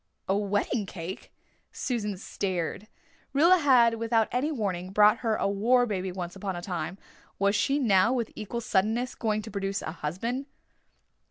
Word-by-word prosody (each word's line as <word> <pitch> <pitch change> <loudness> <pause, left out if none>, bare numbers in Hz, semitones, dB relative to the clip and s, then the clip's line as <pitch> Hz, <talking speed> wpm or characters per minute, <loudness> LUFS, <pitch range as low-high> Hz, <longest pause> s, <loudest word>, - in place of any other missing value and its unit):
"A 195 - +2
wedding 205 +1 0
cake!" 180 +1 -7 0.4
Susan 210 -6 -2
stared. 185 +1 -3 0.5
Rilla 340 +6 +6
had, 240 -6 +4
without 225 -1 +2
any 260 +6 0
warning, 190 - -2
brought 210 +3 +5
her 225 -3 0
a - - 0
war 235 +5 +3
baby 190 -4 -2
once 180 -1 -6
upon 195 -1 -4
a 175 - -5
time. 180 0 -4 0.4
Was 200 +1 +2
she 275 +7 +2
now, 210 -6 +4
with 240 -3 -1
equal 225 +3 -4
suddenness, 220 +5 0
going 215 -2 -1
to 220 - -8
produce 195 0 -2
a - - -4
husband? 190 - -3
210 Hz, 160 wpm, -28 LUFS, 190-235 Hz, 0.5 s, Rilla